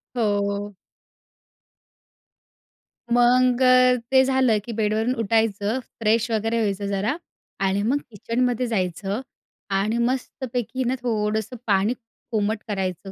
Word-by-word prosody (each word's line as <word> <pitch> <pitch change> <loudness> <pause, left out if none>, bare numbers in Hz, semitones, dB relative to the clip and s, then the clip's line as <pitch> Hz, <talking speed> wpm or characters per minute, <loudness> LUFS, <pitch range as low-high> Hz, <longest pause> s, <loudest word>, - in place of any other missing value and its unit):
हो, 245 - 0 0.3
हो. 205 0 -5 2.4
मग 245 +1 +4 0.5
ते 265 0 +6
झालं 260 -4 +3
की 240 - -5
बेडवरून 220 +2 0
उठायचं, 220 +1 +1 0.2
फ्रेश 225 +1 +2
वगैरे 225 +1 0
व्हायचं 200 -2 -1
जरा 200 +6 0 0.5
आणि 195 +1 +1
मग 255 +7 +2
किचनमध्ये 240 +3 -1
जायचं 195 0 -2 0.5
आणि 200 +4 +1
मस्तपैकी 250 0 -2
ना 250 +1 0
थोडंसं 220 -1 -1
पाणी 200 +2 +3 0.4
कोमट 215 0 0
करायचं. 195 -2 -3
220 Hz, 105 wpm, -23 LUFS, 205-245 Hz, 2.4 s, ते